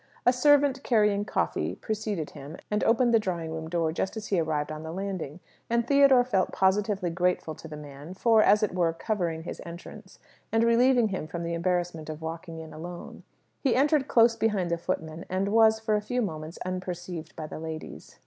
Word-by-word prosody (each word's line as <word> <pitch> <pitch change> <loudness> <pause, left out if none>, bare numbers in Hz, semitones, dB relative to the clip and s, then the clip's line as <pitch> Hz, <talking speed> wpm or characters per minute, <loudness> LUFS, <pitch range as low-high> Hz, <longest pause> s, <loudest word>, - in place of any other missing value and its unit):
A 245 - +6
servant 280 0 +4
carrying 210 -5 +2
coffee, - - -1
preceded 210 -7 -3
him, 145 +3 -9
and 210 - +1
opened 235 +1 +3
the 230 - +6
drawing 170 -6 -3
room 160 0 -5
door 165 -2 0
just 190 +6 -3
as 215 - -5
he 195 - +2
arrived 155 -2 -1
on 155 0 -6
the 160 0 -6
landing; 185 -4 -5 0.3
and 235 0 +1
Theodore 275 -2 +6
felt 200 -7 0
positively 190 -1 +1
grateful 180 -2 0
to 165 - -11
the 155 -1 -8
man 145 +4 -10
for, 225 +2 +4
as 210 +1 +5
it 210 - 0
were, 170 -2 +1
covering 165 -3 -2
his - - -7
entrance, 185 +4 -11 0.3
and 225 +1 +3
relieving 235 0 +4
him 185 -5 -4
from 170 +1 -5
the 170 0 -3
embarrassment 170 -2 -1
of 155 -1 -5
walking 165 +1 -6
in 160 - -10
alone. 175 +2 -8 0.4
He 270 - +1
entered 285 +1 +3
close 230 -3 +5
behind 210 -6 0
the 170 - 0
footman, 160 -2 -4
and 190 +2 0
was, 220 0 +5
for 220 -1 -1
a 210 - +2
few 245 +4 -1
moments, 160 -4 -5
unperceived 180 -3 -5
by 155 - -5
the 155 - -7
ladies. 160 -1 -8
185 Hz, 195 wpm, -27 LUFS, 165-220 Hz, 0.4 s, A